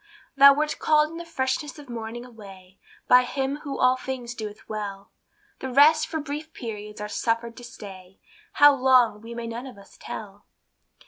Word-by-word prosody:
Thou 280 Hz, 0 st, +8 dB
wert 300 Hz, +1 st, -1 dB
called 305 Hz, 0 st, +3 dB
in 330 Hz, -, -8 dB
the 340 Hz, -, -7 dB
freshness 290 Hz, -1 st, -3 dB
of 290 Hz, -2 st, -12 dB
morning 235 Hz, 0 st, -6 dB
away, 195 Hz, -5 st, -14 dB, 0.3 s
By 250 Hz, -, +7 dB
him 270 Hz, +2 st, -2 dB
who 285 Hz, -2 st, -6 dB
all 255 Hz, 0 st, +3 dB
things 255 Hz, -2 st, -6 dB
doeth 215 Hz, -3 st, -8 dB
well; 200 Hz, -2 st, -6 dB, 0.5 s
The 265 Hz, -, -5 dB
rest 310 Hz, +4 st, +5 dB
for 320 Hz, -, -3 dB
brief 300 Hz, +2 st, -6 dB
periods 210 Hz, -3 st, -7 dB
are 210 Hz, -, -4 dB
suffered 230 Hz, +2 st, -2 dB
to 245 Hz, -, -11 dB
stay, 195 Hz, -5 st, -12 dB, 0.3 s
How 290 Hz, 0 st, +7 dB
long, 255 Hz, -5 st, +3 dB
we 230 Hz, +1 st, -9 dB
may 235 Hz, 0 st, -5 dB
none 235 Hz, +3 st, -6 dB
of 250 Hz, -, -12 dB
us 200 Hz, -, -17 dB
tell. 205 Hz, -1 st, -9 dB
245 Hz, 180 wpm, -25 LUFS, 215-280 Hz, 0.5 s, Thou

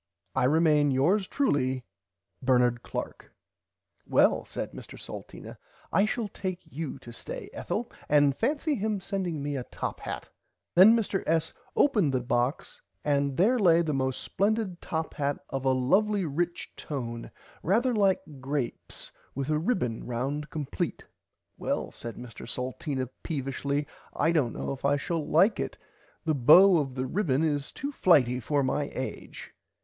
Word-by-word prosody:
I -, -, +2 dB
remain 150 Hz, 0 st, +4 dB
Yours 175 Hz, +10 st, +2 dB
truely 130 Hz, -, 0 dB, 0.6 s
Bernard 125 Hz, -2 st, +3 dB
Clark. -, -, -5 dB
[Pg -, -, -18 dB, 0.8 s
25] -, -, -16 dB
Well -, -, +4 dB
said -, -, -5 dB
Mr -, -, -10 dB
Salteena -, -, -9 dB, 0.3 s
I 200 Hz, -, +5 dB
shall 230 Hz, 0 st, -1 dB
take 185 Hz, -2 st, -4 dB
you 155 Hz, -1 st, -5 dB
to 120 Hz, -, -12 dB
stay -, -, -6 dB
Ethel -, -, -3 dB, 0.2 s
and 145 Hz, -2 st, +5 dB
fancy 295 Hz, -, 0 dB
him 215 Hz, -4 st, -1 dB
sending 180 Hz, -6 st, -3 dB
me 145 Hz, 0 st, -2 dB
a 130 Hz, -, -2 dB
top -, -, -5 dB
hat. -, -, -5 dB, 0.5 s
Then 195 Hz, +6 st, +8 dB
Mr 205 Hz, -4 st, 0 dB
S. 160 Hz, 0 st, +1 dB, 0.2 s
opened 205 Hz, -, +3 dB
the -, -, +3 dB
box 120 Hz, +3 st, -1 dB, 0.2 s
and 140 Hz, -2 st, +1 dB
there 235 Hz, +8 st, +4 dB
lay 170 Hz, -4 st, +5 dB
the 155 Hz, -2 st, -1 dB
most 130 Hz, -1 st, -1 dB
splendid 205 Hz, -3 st, 0 dB
top 160 Hz, 0 st, -3 dB
hat 145 Hz, 0 st, -1 dB
of 135 Hz, 0 st, -3 dB
a 130 Hz, -, +4 dB
lovly 190 Hz, +10 st, +2 dB
rich 170 Hz, +4 st, -2 dB
tone 120 Hz, -5 st, -5 dB, 0.3 s
rarther 235 Hz, +8 st, +2 dB
like 195 Hz, -3 st, +3 dB, 0.2 s
grapes 135 Hz, -1 st, -4 dB, 0.2 s
with 140 Hz, +2 st, -2 dB
a 150 Hz, -, +2 dB
ribbon 160 Hz, -, -1 dB
round 135 Hz, +5 st, -2 dB
compleat. 145 Hz, -3 st, -3 dB, 0.6 s
Well -, -, -2 dB
said 115 Hz, -1 st, -7 dB
Mr 120 Hz, -1 st, -9 dB
Salteena 130 Hz, +1 st, -3 dB
peevishly 140 Hz, -1 st, -2 dB, 0.3 s
I 165 Hz, -, +2 dB
dont 145 Hz, -8 st, +1 dB
know -, -, -3 dB
if 135 Hz, -, -6 dB
I 140 Hz, +1 st, +3 dB
shall 165 Hz, +3 st, -2 dB
like 185 Hz, +9 st, +3 dB
it -, -, -3 dB, 0.5 s
the 160 Hz, -, +2 dB
bow 170 Hz, +7 st, +7 dB
of 135 Hz, -3 st, -3 dB
the 130 Hz, 0 st, -1 dB
ribbon 150 Hz, -2 st, +1 dB
is 145 Hz, -3 st, 0 dB
too 285 Hz, +1 st, -4 dB
flighty 130 Hz, -, +4 dB
for 140 Hz, +4 st, 0 dB
my 140 Hz, +2 st, 0 dB
age. 130 Hz, -, -6 dB
150 Hz, 155 wpm, -28 LUFS, 130-185 Hz, 0.8 s, Then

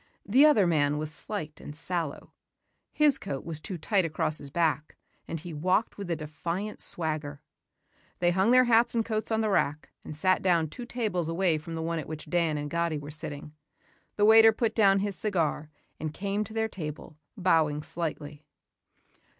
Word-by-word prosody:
The 260 Hz, +9 st, +6 dB
other 220 Hz, -11 st, +5 dB
man 150 Hz, -3 st, +2 dB
was 155 Hz, 0 st, -4 dB
slight 160 Hz, -5 st, -6 dB
and 145 Hz, -, -9 dB
sallow. 165 Hz, -2 st, -4 dB, 0.6 s
His 295 Hz, -3 st, +3 dB
coat 135 Hz, -1 st, -5 dB
was 160 Hz, -2 st, -3 dB
too 185 Hz, +3 st, -6 dB
tight 190 Hz, +4 st, +1 dB
across 155 Hz, -1 st, -1 dB
his 140 Hz, -, -7 dB
back 155 Hz, -1 st, -1 dB, 0.3 s
and 165 Hz, -, -4 dB
he 170 Hz, +1 st, -8 dB
walked 185 Hz, +8 st, 0 dB
with 200 Hz, -3 st, -5 dB
a 170 Hz, -, +1 dB
defiant 170 Hz, +6 st, -5 dB
swagger. 155 Hz, -3 st, -2 dB, 0.8 s
They 175 Hz, 0 st, +2 dB
hung 190 Hz, +4 st, +2 dB
their 255 Hz, +1 st, +7 dB
hats 235 Hz, 0 st, +3 dB
and 225 Hz, -1 st, +1 dB
coats 220 Hz, -1 st, -2 dB
on 220 Hz, -1 st, +1 dB
the 215 Hz, -, 0 dB
rack 150 Hz, -5 st, 0 dB
and 150 Hz, -, -7 dB
sat 185 Hz, +4 st, +2 dB
down 170 Hz, -4 st, +2 dB
two 240 Hz, +9 st, -8 dB
tables 205 Hz, -10 st, -2 dB
away 165 Hz, -2 st, +1 dB
from 165 Hz, +2 st, -7 dB
the 160 Hz, -, -3 dB
one 165 Hz, 0 st, -2 dB
at 155 Hz, -, -6 dB
which 155 Hz, 0 st, -8 dB
Dan 165 Hz, -3 st, +1 dB
and 145 Hz, 0 st, -3 dB
Gatti 170 Hz, 0 st, -1 dB
were 145 Hz, 0 st, -8 dB
sitting. 150 Hz, 0 st, -7 dB, 0.6 s
The 205 Hz, -, +3 dB
waiter 225 Hz, +1 st, +8 dB
put 220 Hz, 0 st, -1 dB
down 195 Hz, -3 st, +4 dB
his 200 Hz, -1 st, -2 dB
cigar 165 Hz, -7 st, -1 dB, 0.3 s
and 155 Hz, -1 st, -3 dB
came 200 Hz, +5 st, -2 dB
to 220 Hz, -, -11 dB
their 220 Hz, 0 st, +1 dB
table, 155 Hz, -5 st, -8 dB, 0.2 s
bowing 160 Hz, -5 st, +2 dB
slightly. 155 Hz, -3 st, -5 dB
170 Hz, 185 wpm, -28 LUFS, 155-205 Hz, 0.8 s, waiter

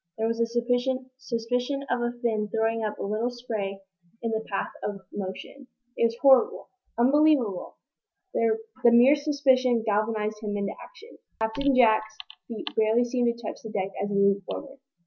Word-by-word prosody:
There 220 Hz, -, 0 dB
was 230 Hz, 0 st, -1 dB
a 230 Hz, -, +2 dB, 0.8 s
suspicion 245 Hz, +4 st, -2 dB
of 245 Hz, -, +1 dB
a 240 Hz, 0 st, 0 dB
fin 215 Hz, -3 st, 0 dB
throwing 225 Hz, +1 st, 0 dB
up 210 Hz, -1 st, -3 dB
a -, -, -5 dB
little 215 Hz, +4 st, -1 dB
spray 220 Hz, -5 st, -5 dB, 0.4 s
in 230 Hz, -, -1 dB
the 220 Hz, 0 st, -1 dB
path 195 Hz, -, -2 dB
of 200 Hz, -1 st, -4 dB
motion. 205 Hz, +7 st, -7 dB, 0.3 s
It -, -, +2 dB
was 230 Hz, 0 st, -1 dB
horrible 265 Hz, -2 st, +4 dB, 0.3 s
unbelievable! 260 Hz, -5 st, +3 dB, 0.6 s
The 230 Hz, -1 st, +2 dB, 0.3 s
mere 240 Hz, +4 st, +7 dB
suspicion 265 Hz, -5 st, +2 dB
galvanized 215 Hz, 0 st, 0 dB
him 205 Hz, -1 st, -3 dB
into 200 Hz, 0 st, -2 dB
action. 475 Hz, -1 st, -15 dB, 0.2 s
Captain 260 Hz, +5 st, +1 dB
Jack's 220 Hz, -3 st, +3 dB, 0.3 s
feet 230 Hz, -3 st, -6 dB
barely 220 Hz, +2 st, +3 dB
seemed 240 Hz, -1 st, +1 dB
to 235 Hz, -, -12 dB
touch -, -, -6 dB
the 220 Hz, -, -8 dB
deck 195 Hz, -2 st, -2 dB
as 205 Hz, -, -2 dB
he 205 Hz, -, -2 dB
leaped 200 Hz, -1 st, +3 dB
forward. 275 Hz, -1 st, -7 dB
230 Hz, 165 wpm, -26 LUFS, 215-250 Hz, 0.8 s, mere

